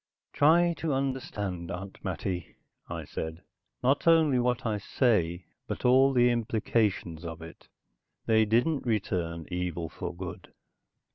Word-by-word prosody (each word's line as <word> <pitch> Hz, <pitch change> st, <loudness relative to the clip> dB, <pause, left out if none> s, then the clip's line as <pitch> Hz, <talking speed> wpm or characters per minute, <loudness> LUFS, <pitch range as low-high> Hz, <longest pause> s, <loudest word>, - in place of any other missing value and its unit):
"Try 170 Hz, +4 st, +5 dB
to 160 Hz, -3 st, -1 dB
understand, 105 Hz, -10 st, -3 dB
Aunt 95 Hz, +1 st, -7 dB
Mattie," 90 Hz, 0 st, -4 dB, 0.3 s
I -, -, -5 dB
said. 80 Hz, +2 st, -6 dB, 0.4 s
"Not 135 Hz, +6 st, +2 dB
only 160 Hz, -6 st, +5 dB
what 125 Hz, +1 st, 0 dB
I 105 Hz, -2 st, 0 dB
say, 95 Hz, -7 st, +1 dB, 0.2 s
but -, -, -5 dB
all 130 Hz, +2 st, +6 dB
the 125 Hz, -2 st, +4 dB
implications 110 Hz, -7 st, 0 dB
of 85 Hz, -1 st, -6 dB
it. 80 Hz, -, -12 dB, 0.6 s
They 110 Hz, -1 st, +4 dB
didn't 125 Hz, +8 st, +2 dB
return 85 Hz, -7 st, -1 dB
evil 90 Hz, -2 st, -3 dB
for -, -, -5 dB
good. 90 Hz, 0 st, -8 dB
105 Hz, 130 wpm, -29 LUFS, 90-130 Hz, 0.6 s, all